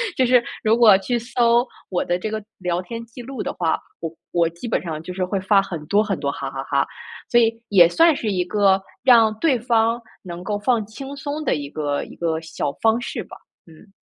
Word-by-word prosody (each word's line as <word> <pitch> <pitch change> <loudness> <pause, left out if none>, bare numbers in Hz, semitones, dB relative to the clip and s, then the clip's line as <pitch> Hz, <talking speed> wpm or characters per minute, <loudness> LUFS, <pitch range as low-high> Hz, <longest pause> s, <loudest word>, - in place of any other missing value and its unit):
就 260 - +3
是 245 -1 +4 0.2
如 220 0 +3
果 230 -4 +7
去 240 +5 -1
搜 235 0 +2 0.2
我 180 - 0
的 175 0 0
这 215 - -3
个 215 -1 -4 0.2
聊 180 -1 -1
天 230 +5 -7
记 235 +2 -11
录 265 -1 -6
的 - - -3
话， 165 -2 0 0.2
我 165 -1 -4 0.2
我 170 -1 +3
基 170 +8 -8
本 - - 0
上 160 -3 -5
就 180 +3 -7
是 185 0 -2
会 195 +2 -2
发 195 +1 +4
很 170 -5 -6
多 205 +1 +3
很 200 -4 -2
多 140 - -1
哈 135 -1 -5
哈 135 0 -5
哈， 140 0 +1 0.4
所 240 - +5
以 225 -1 +3 0.2
也 180 -4 +7
算 330 - +4
是 220 -5 -2
一 180 -2 0
个 195 0 +3 0.2
让 230 -4 +6
对 280 -3 +3
方 230 0 +1 0.2
能 175 -1 -7
够 205 +1 -2
放 230 0 +1
轻 270 +6 -8
松 285 +2 -4
的 - - +2
一 145 -1 -5
个 145 -1 -2
一 - - -13
个 165 -1 -1
小 160 -3 -3
方 225 +1 +3
式 245 - -5
吧。 - - -12 0.3
嗯。 180 +5 -18
205 Hz, 245 characters per minute, -22 LUFS, 170-235 Hz, 0.4 s, 果